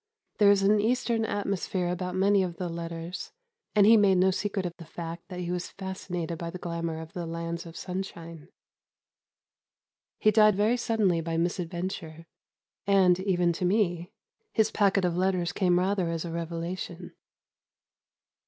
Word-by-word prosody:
There 205 Hz, -1 st, +7 dB
is 200 Hz, -1 st, +4 dB
an 205 Hz, +1 st, +4 dB
Eastern 230 Hz, 0 st, +1 dB
atmosphere 195 Hz, -3 st, -2 dB
about 180 Hz, +1 st, -3 dB
many 200 Hz, +1 st, +4 dB
of 175 Hz, -2 st, -3 dB
the 180 Hz, -2 st, -3 dB
letters, 170 Hz, +1 st, -6 dB, 0.4 s
and 205 Hz, -1 st, +6 dB
he 225 Hz, +2 st, +8 dB
made 200 Hz, -3 st, +4 dB
no 185 Hz, +1 st, +4 dB
secret 200 Hz, 0 st, -2 dB
of 175 Hz, -1 st, -4 dB
the 170 Hz, -, -10 dB
fact 170 Hz, +1 st, -7 dB
that 180 Hz, -2 st, -6 dB
he 175 Hz, 0 st, -3 dB
was 180 Hz, 0 st, -3 dB
fascinated 180 Hz, -3 st, -5 dB
by 170 Hz, -, -4 dB
the 180 Hz, -, -6 dB
glamour 170 Hz, -2 st, -4 dB
of 160 Hz, 0 st, -9 dB
the 175 Hz, -2 st, -4 dB
lands 170 Hz, +1 st, -4 dB
of 165 Hz, -, -10 dB
sunshine. 170 Hz, -4 st, -6 dB, 1.7 s
He 215 Hz, -, +4 dB
died 215 Hz, -1 st, +5 dB
very 210 Hz, +4 st, +3 dB
suddenly 215 Hz, -8 st, +1 dB
by 165 Hz, 0 st, -2 dB
misadventure, 170 Hz, -1 st, -3 dB, 0.6 s
and, 185 Hz, -3 st, +5 dB
even 180 Hz, -3 st, +1 dB
to 170 Hz, -, -5 dB
me, 180 Hz, -3 st, +1 dB, 0.4 s
his 220 Hz, -1 st, +2 dB
packet 195 Hz, -2 st, +2 dB
of 175 Hz, -1 st, 0 dB
letters 180 Hz, -1 st, +1 dB
came 180 Hz, -2 st, +2 dB
rather 185 Hz, -1 st, +1 dB
as 165 Hz, 0 st, -3 dB
a 170 Hz, -, -5 dB
revelation. 170 Hz, +1 st, -5 dB
180 Hz, 160 wpm, -28 LUFS, 170-195 Hz, 1.7 s, he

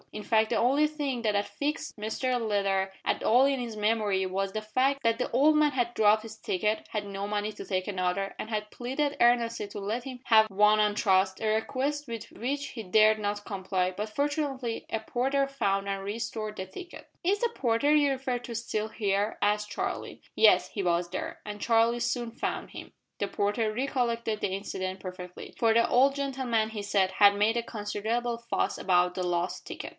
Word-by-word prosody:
In 210 Hz, -, -7 dB
fact 220 Hz, 0 st, +2 dB
the -, -, +1 dB
only 275 Hz, +5 st, +3 dB
thing 285 Hz, -5 st, -3 dB
that 215 Hz, -2 st, +1 dB
had 205 Hz, 0 st, +1 dB
fixed 295 Hz, +2 st, -3 dB
Mr 225 Hz, +4 st, -1 dB
Leather 195 Hz, -2 st, 0 dB
at -, -, 0 dB
all 250 Hz, +4 st, +5 dB
in 275 Hz, -2 st, +1 dB
his 230 Hz, -3 st, -5 dB
memory 210 Hz, -3 st, +1 dB
was 195 Hz, +1 st, -2 dB
the 215 Hz, -, -3 dB
fact 260 Hz, +6 st, 0 dB
that 230 Hz, 0 st, +2 dB
the 250 Hz, -, -1 dB
old 290 Hz, +6 st, +4 dB
man 300 Hz, -1 st, +4 dB
had 240 Hz, -3 st, -1 dB
dropped 215 Hz, 0 st, +4 dB
his 220 Hz, -1 st, -9 dB
ticket, 215 Hz, +1 st, -1 dB
had 210 Hz, -2 st, -3 dB
no 200 Hz, 0 st, -4 dB
money 210 Hz, +1 st, -2 dB
to -, -, -8 dB
take 185 Hz, -1 st, -2 dB
another, 190 Hz, 0 st, -1 dB
and 215 Hz, -, -6 dB
had 210 Hz, -1 st, -3 dB
pleaded 280 Hz, +4 st, -2 dB
earnestly 235 Hz, -2 st, +3 dB
to 205 Hz, -, -7 dB
let 215 Hz, +5 st, -3 dB
him 260 Hz, -2 st, -7 dB
have 220 Hz, -1 st, +5 dB
one 210 Hz, +2 st, +4 dB
on 210 Hz, -1 st, +2 dB
trust, 190 Hz, -2 st, +2 dB
a 220 Hz, -, -2 dB
request 270 Hz, +7 st, -1 dB
with 230 Hz, -1 st, -5 dB
which 275 Hz, +6 st, -3 dB
he 225 Hz, -, -7 dB
dared 215 Hz, +3 st, +4 dB
not 205 Hz, 0 st, -3 dB
comply 185 Hz, -2 st, -1 dB
but 210 Hz, +3 st, -4 dB
fortunately, 275 Hz, -2 st, -2 dB
a 225 Hz, -, -1 dB
porter 265 Hz, +5 st, 0 dB
found 200 Hz, -8 st, -1 dB
and 195 Hz, -1 st, -3 dB
restored 215 Hz, +1 st, -4 dB
the 190 Hz, -, -4 dB
ticket. 345 Hz, -, -10 dB, 0.2 s
"Is 395 Hz, +4 st, +2 dB
the 475 Hz, -, +1 dB
porter 275 Hz, -, +2 dB
you 290 Hz, -1 st, +4 dB
refer 260 Hz, -2 st, -1 dB
to 240 Hz, -1 st, -8 dB
still 220 Hz, -1 st, -2 dB
here?" 205 Hz, -1 st, -1 dB
asked 210 Hz, 0 st, +1 dB
Charlie. 205 Hz, -, -4 dB
Yes, -, -, +5 dB
he 200 Hz, -, -3 dB
was 175 Hz, 0 st, +1 dB
there; 185 Hz, -, -5 dB
and 210 Hz, -1 st, -7 dB
Charlie 230 Hz, +1 st, +3 dB
soon 240 Hz, -1 st, -1 dB
found 230 Hz, -, -4 dB
him. -, -, -9 dB, 0.3 s
The 200 Hz, -, -1 dB
porter 210 Hz, +3 st, 0 dB
recollected 235 Hz, -3 st, -1 dB
the -, -, 0 dB
incident 190 Hz, -1 st, -4 dB
perfectly, 180 Hz, -1 st, -8 dB
for 225 Hz, -1 st, +3 dB
the 230 Hz, +1 st, +4 dB
old 270 Hz, +3 st, +4 dB
gentleman, 260 Hz, -6 st, -1 dB
he 215 Hz, -2 st, -4 dB
said, 200 Hz, -2 st, +1 dB
had 200 Hz, -1 st, +6 dB
made 210 Hz, +3 st, +2 dB
a 235 Hz, -, 0 dB
considerable 230 Hz, +2 st, -2 dB
fuss 235 Hz, 0 st, -1 dB
about 180 Hz, -1 st, +2 dB
the 185 Hz, -, -2 dB
lost 175 Hz, 0 st, -2 dB
ticket. -, -, -6 dB
220 Hz, 200 wpm, -28 LUFS, 200-245 Hz, 0.3 s, had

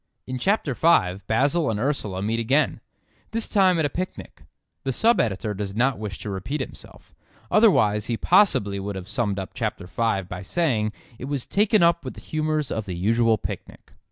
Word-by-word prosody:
In 130 Hz, 0 st, -4 dB
chapter 190 Hz, -, +1 dB
five 95 Hz, -, +2 dB
Basil 140 Hz, +8 st, +2 dB
and 105 Hz, -2 st, -1 dB
Ursula 105 Hz, -8 st, -1 dB
meet 115 Hz, +2 st, 0 dB
again; 130 Hz, +1 st, +1 dB, 0.5 s
this 230 Hz, 0 st, -2 dB
time 190 Hz, -3 st, +3 dB
at 160 Hz, -, +2 dB
a -, -, +1 dB
picnic. 185 Hz, +6 st, -6 dB, 0.4 s
The 135 Hz, -, -1 dB
sub 230 Hz, -, +3 dB
editor 110 Hz, -1 st, -1 dB
does 100 Hz, 0 st, -5 dB
not 125 Hz, 0 st, +1 dB
wish 105 Hz, -3 st, -5 dB
to 105 Hz, -, -4 dB
repeat 100 Hz, +11 st, -3 dB
himself, 130 Hz, -, -9 dB, 0.4 s
otherwise 105 Hz, -, +4 dB
he 115 Hz, -, -1 dB
possibly 105 Hz, -, +3 dB
would 100 Hz, +1 st, -4 dB
have 95 Hz, -1 st, -7 dB
summed 105 Hz, -1 st, -1 dB
up 95 Hz, -1 st, -5 dB
chapter -, -, -3 dB
five 95 Hz, +1 st, -1 dB
by 90 Hz, 0 st, -6 dB
saying 110 Hz, -, 0 dB, 0.3 s
it -, -, -5 dB
was 140 Hz, -2 st, -3 dB
"taken 210 Hz, -1 st, +3 dB
up 170 Hz, 0 st, +3 dB
with -, -, -6 dB
the -, -, -11 dB
humours 155 Hz, -2 st, -2 dB
of 110 Hz, -2 st, -3 dB
the 90 Hz, -, -4 dB
usual 115 Hz, +5 st, +2 dB
picnic." -, -, -8 dB
115 Hz, 185 wpm, -24 LUFS, 100-155 Hz, 0.5 s, otherwise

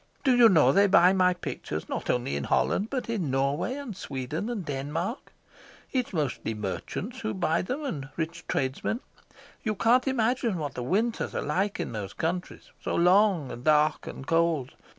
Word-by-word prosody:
Do 260 Hz, -3 st, +4 dB
you 240 Hz, -2 st, +8 dB
know, 155 Hz, -9 st, +5 dB
they 200 Hz, +6 st, +5 dB
buy 185 Hz, -1 st, +6 dB
my 180 Hz, -1 st, +3 dB
pictures -, -, -5 dB
not -, -, -4 dB
only 120 Hz, -, 0 dB
in 70 Hz, -, -2 dB
Holland, 210 Hz, +3 st, +1 dB
but 260 Hz, -2 st, -3 dB
in 205 Hz, -10 st, -1 dB
Norway 140 Hz, -, 0 dB
and 275 Hz, -8 st, -6 dB
Sweden 145 Hz, -, -4 dB
and 215 Hz, -7 st, -3 dB
Denmark? 150 Hz, -, -4 dB, 0.6 s
It's 255 Hz, -3 st, -1 dB
mostly 145 Hz, -, -2 dB
merchants 105 Hz, -, -5 dB
who 220 Hz, -, -3 dB
buy 165 Hz, -3 st, +1 dB
them, 260 Hz, +10 st, -4 dB
and 145 Hz, -, -4 dB
rich 165 Hz, 0 st, -3 dB
tradesmen. 135 Hz, -, -1 dB, 0.6 s
You 215 Hz, -2 st, -1 dB
can't 240 Hz, +6 st, +3 dB
imagine 240 Hz, -4 st, +1 dB
what 145 Hz, -4 st, -4 dB
the 125 Hz, -, -5 dB
winters 215 Hz, -, 0 dB
are -, -, -1 dB
like 190 Hz, +7 st, -1 dB
in -, -, -3 dB
those 105 Hz, -4 st, -5 dB
countries, 175 Hz, +3 st, -4 dB
so -, -, -2 dB
long 180 Hz, -4 st, +4 dB
and 120 Hz, -, -8 dB
dark 150 Hz, 0 st, +3 dB
and 135 Hz, -, -7 dB
cold. 165 Hz, -4 st, +1 dB
175 Hz, 175 wpm, -27 LUFS, 140-220 Hz, 0.6 s, you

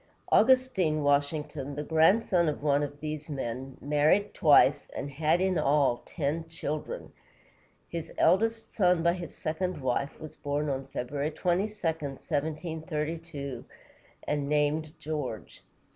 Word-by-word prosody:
Augustine 210 Hz, -, +4 dB
Washington, 145 Hz, 0 st, 0 dB
the 150 Hz, -, -3 dB
grandson 170 Hz, +3 st, +3 dB
of 150 Hz, -, -5 dB
one 145 Hz, -1 st, +3 dB
of 145 Hz, 0 st, -4 dB
these 155 Hz, 0 st, -5 dB
men, 130 Hz, -1 st, -5 dB
married 150 Hz, +8 st, +2 dB
twice, 145 Hz, -2 st, +5 dB
and 140 Hz, -, -4 dB
had, 155 Hz, +4 st, +2 dB
in 190 Hz, -1 st, +1 dB
all, 140 Hz, -4 st, +2 dB
ten 160 Hz, +1 st, -2 dB
children. 165 Hz, -, -5 dB, 0.7 s
His 165 Hz, -2 st, -5 dB
eldest 225 Hz, +6 st, +2 dB
son 180 Hz, -4 st, +3 dB
by 170 Hz, 0 st, +4 dB
his 175 Hz, -3 st, -7 dB
second 170 Hz, +2 st, -2 dB
wife 130 Hz, +1 st, -1 dB
was 155 Hz, -1 st, -9 dB
born 145 Hz, +1 st, -2 dB
on 135 Hz, -1 st, -3 dB
February 140 Hz, +3 st, -3 dB
22, 175 Hz, +5 st, 0 dB, 0.2 s
1732, 155 Hz, -1 st, -3 dB, 0.6 s
and 145 Hz, -1 st, -1 dB
named 150 Hz, +1 st, +1 dB
George. 150 Hz, -7 st, -5 dB
150 Hz, 125 wpm, -29 LUFS, 145-170 Hz, 0.7 s, twice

